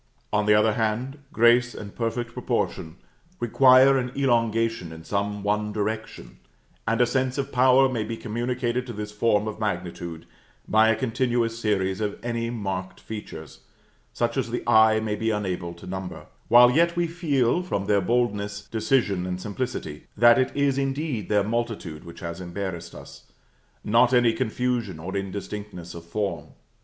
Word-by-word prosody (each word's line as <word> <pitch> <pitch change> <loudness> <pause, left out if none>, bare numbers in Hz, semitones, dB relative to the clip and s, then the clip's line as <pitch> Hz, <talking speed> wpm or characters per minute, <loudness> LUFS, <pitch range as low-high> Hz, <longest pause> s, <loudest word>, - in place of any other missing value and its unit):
On 105 0 +1
the 105 - +6
other 105 +1 +4
hand, 120 +6 -2
grace 120 +1 +4
and 100 -1 -9
perfect 120 0 -3
proportion 80 -7 -2 0.4
require 130 +3 +6
an 125 -1 -3
elongation 115 -7 +1
in 80 0 -10
some 100 +2 -2
one 105 +1 0
direction: 110 +1 -4 0.5
and 115 +1 +1
a - - +6
sense 130 +1 -1
of 140 0 -2
power 130 +1 +5
may 120 -4 -2
be 115 +1 -5
communicated 120 +2 -2
to 120 - -6
this 105 0 -6
form 105 0 +1
of 110 0 -5
magnitude 85 -5 -4 0.4
by 110 +1 +4
a 115 - +3
continuous 120 -2 -1
series 95 -3 0
of 105 -1 -2
any 115 -1 -2
marked 95 -5 -4
features, 110 -1 -9 0.5
such - - -1
as - - -1
the - - -3
eye 110 0 +5
may 110 -1 -2
be 110 +2 -1
unable 95 -5 -2
to 85 - -13
number; 95 0 -6 0.2
while 120 +1 +7
yet 170 +5 +3
we 175 0 +1
feel, 165 -4 +1
from 100 - -3
their 100 -1 +2
boldness, 105 -2 -1
decision, 110 -5 +1
and 90 0 -3
simplicity, 105 - -5
that 120 +2 +6
it 130 - +1
is 140 -1 +1
indeed 135 - -2
their 105 -1 +3
multitude 110 -8 -3
which 85 - -11
has 85 +1 -6
embarrassed 85 -2 -5
us, - - -13 0.5
not 120 +3 +4
any 120 -2 +4
confusion 120 -4 -2
or 90 +5 -6
indistinctness 100 -2 -6
of 85 - -9
form. 85 -3 -3
110 Hz, 160 wpm, -25 LUFS, 100-120 Hz, 0.5 s, while